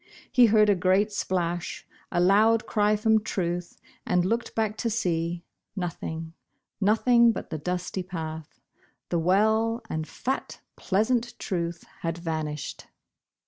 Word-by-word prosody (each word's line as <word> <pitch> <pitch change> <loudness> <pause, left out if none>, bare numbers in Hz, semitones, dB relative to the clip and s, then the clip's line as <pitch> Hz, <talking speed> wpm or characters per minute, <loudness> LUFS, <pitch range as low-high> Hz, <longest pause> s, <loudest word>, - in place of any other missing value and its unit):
He 245 -2 +6
heard 215 -1 +5
a 205 - +5
great 190 +3 +2
splash, 175 -3 -2 0.3
a - - +1
loud 215 +5 +4
cry 210 0 +2
from 220 0 +2
Truth, 175 -3 -3 0.3
and 180 0 +1
looked 230 +5 -1
back 220 -1 0
to 235 - -1
see 170 -5 -1 0.2
— - - -58
nothing, 165 -3 -4 0.5
nothing 235 +3 +5
but - - -6
the 155 - -3
dusty 180 +3 -3
path. 160 -4 -7 0.5
The 170 - +1
w^ell 220 +6 +2
and 155 0 -3
fat, 265 - -4 0.2
pleasant 235 +4 0
Truth 170 -3 -3 0.2
had 165 0 -3
vanished 155 -3 -4
185 Hz, 135 wpm, -26 LUFS, 170-220 Hz, 0.5 s, He